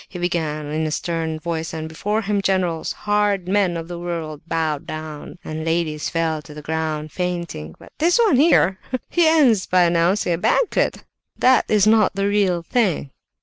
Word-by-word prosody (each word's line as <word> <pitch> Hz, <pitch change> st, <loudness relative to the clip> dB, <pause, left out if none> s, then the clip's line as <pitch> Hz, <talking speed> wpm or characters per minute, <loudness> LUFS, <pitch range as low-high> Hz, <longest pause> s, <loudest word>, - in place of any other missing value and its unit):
He -, -, -8 dB
began 160 Hz, -4 st, -2 dB
in 155 Hz, +2 st, -2 dB
a -, -, -2 dB
stern 160 Hz, 0 st, -2 dB
voice, 165 Hz, 0 st, -4 dB
and 160 Hz, 0 st, -4 dB
before 210 Hz, +7 st, -2 dB
him 200 Hz, 0 st, 0 dB
generals, 185 Hz, -4 st, 0 dB
hard 205 Hz, -3 st, 0 dB
men 190 Hz, -3 st, +1 dB
of 165 Hz, 0 st, -6 dB
the 175 Hz, 0 st, -6 dB
world, 165 Hz, -4 st, -5 dB
bowed 160 Hz, -3 st, -1 dB
down, 155 Hz, +2 st, -7 dB
and 155 Hz, 0 st, -5 dB
ladies 160 Hz, -2 st, -1 dB
fell 165 Hz, -2 st, -1 dB
to 150 Hz, 0 st, -13 dB
the 150 Hz, -, -8 dB
ground 155 Hz, -1 st, -3 dB
fainting. 170 Hz, -, -4 dB
But -, -, -16 dB
this 340 Hz, +3 st, +3 dB
one 445 Hz, -, +4 dB
here—he 265 Hz, -, +2 dB
ends 270 Hz, -11 st, +4 dB
by 180 Hz, -1 st, +4 dB
announcing 175 Hz, +2 st, +2 dB
a 165 Hz, -, -2 dB
banquet! 465 Hz, -, +1 dB, 0.3 s
That 255 Hz, 0 st, +4 dB
is 210 Hz, -2 st, +4 dB
not 215 Hz, -2 st, +4 dB
the 200 Hz, 0 st, 0 dB
real 195 Hz, -4 st, +1 dB
thing!" 180 Hz, -, 0 dB
175 Hz, 175 wpm, -21 LUFS, 160-205 Hz, 0.3 s, one